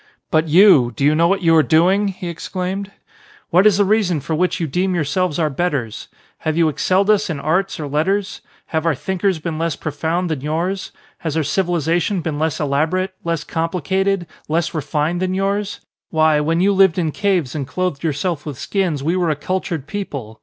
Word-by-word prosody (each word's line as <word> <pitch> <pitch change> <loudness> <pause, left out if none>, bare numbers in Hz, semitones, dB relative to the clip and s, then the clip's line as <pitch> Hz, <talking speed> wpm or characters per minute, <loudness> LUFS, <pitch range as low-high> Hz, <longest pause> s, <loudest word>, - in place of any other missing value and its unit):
"But 160 -1 +2
you, 160 -7 +6
do 135 - 0
you 150 - +5
know 165 +2 +3
what 195 +1 0
you 165 -1 +5
are 160 - +7
doing?" 180 +8 +3
he 185 -2 -5
exclaimed. 185 +3 -4 0.6
"What 180 +4 +6
is 200 -3 +4
the 205 - +3
reason 195 -5 +2
for 160 - -4
which 180 +3 0
you 170 - 0
deem 180 +5 0
yourselves 170 +1 0
our 155 -3 +1
betters? 135 -8 -2 0.3
Have 155 0 -2
you 165 -2 +4
excelled 190 +7 +2
us 210 -1 +1
in 155 -4 -3
arts 175 +7 0
or 150 - -4
letters? 190 +8 -1 0.3
Have 160 +1 0
our 160 - +2
thinkers 190 +4 -1
been 160 0 -4
less 165 -2 -1
profound 160 +4 -2
than 150 -4 -2
yours? 170 +6 -2 0.3
Has 160 -2 -3
our 160 - +2
civilisation 175 +2 0
been 155 -3 -3
less 160 -2 -1
elaborate, 160 +7 0
less 165 -2 -2
complicated, 180 +3 -1 0.2
less 165 +2 0
refined 155 +2 -1
than 185 0 0
yours? 200 +1 -1 0.3
Why, 155 -2 +3
when 165 +3 +1
you 200 +2 +3
lived 190 -3 +4
in 165 -4 0
caves 180 -8 0
and 140 -4 -4
clothed 180 -1 -2
yourselves 160 +1 -1
with 145 -5 -6
skins 175 -7 -1
we 165 +4 +1
were 180 -3 +1
a 155 - +1
cultured 165 -1 -3
people. 140 - -6
170 Hz, 195 wpm, -19 LUFS, 155-185 Hz, 0.6 s, are